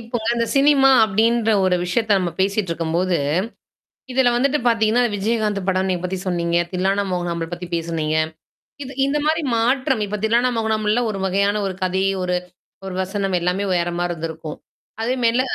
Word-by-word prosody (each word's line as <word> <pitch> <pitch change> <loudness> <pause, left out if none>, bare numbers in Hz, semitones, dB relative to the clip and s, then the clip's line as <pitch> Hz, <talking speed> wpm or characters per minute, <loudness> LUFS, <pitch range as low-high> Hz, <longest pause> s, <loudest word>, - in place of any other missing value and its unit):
இப்பங்க 230 0 -5
இந்த 230 0 0
சினிமா 275 -1 +5 0.2
அப்டின்ற 225 +2 +2
ஒரு 185 -1 +3
விஷயத்த 210 +3 +1
நம்ம 180 -2 -1
பேசிட்டு 195 -1 0
இருக்கும்போது. 170 +2 0 1.0
இதுல 260 -1 +3
வந்துட்டு 275 +4 +2
பாத்தீங்கன்னா, 230 0 +3
விஜயகாந்த் 210 0 0
படம் 190 0 +1
நீங்க 180 -2 -1
பத்தி 185 +1 -2
சொன்னீங்க. 170 -1 0 0.2
தில்லானா 190 +2 +1
மோகனாம்பாள் 170 -2 -3
பத்தி 175 +1 -5
பேசுனீங்க. 160 -2 -1 0.7
இது 270 0 -7
இந்த 290 +2 0
மாரி 320 +1 +1
மாற்றம். 255 +1 +1
இப்ப 210 - -3
தில்லானா 235 +3 +3
மோகனாம்பாள் 220 0 +1
ஒரு 195 - -4
வகையான 200 +2 +1
ஒரு 190 - -3
கதை, 185 +1 0 0.2
ஒரு 180 0 0 0.5
ஒரு 185 - -5
வசனம் 195 0 -2
எல்லாமே 180 +3 -1
வேறமாரி 175 0 -1
இருந்திருக்கும். 160 -1 -6 0.4
அதே 240 +3 0
மெல்ல 235 +2 +3
200 Hz, 155 wpm, -21 LUFS, 180-230 Hz, 1.0 s, சினிமா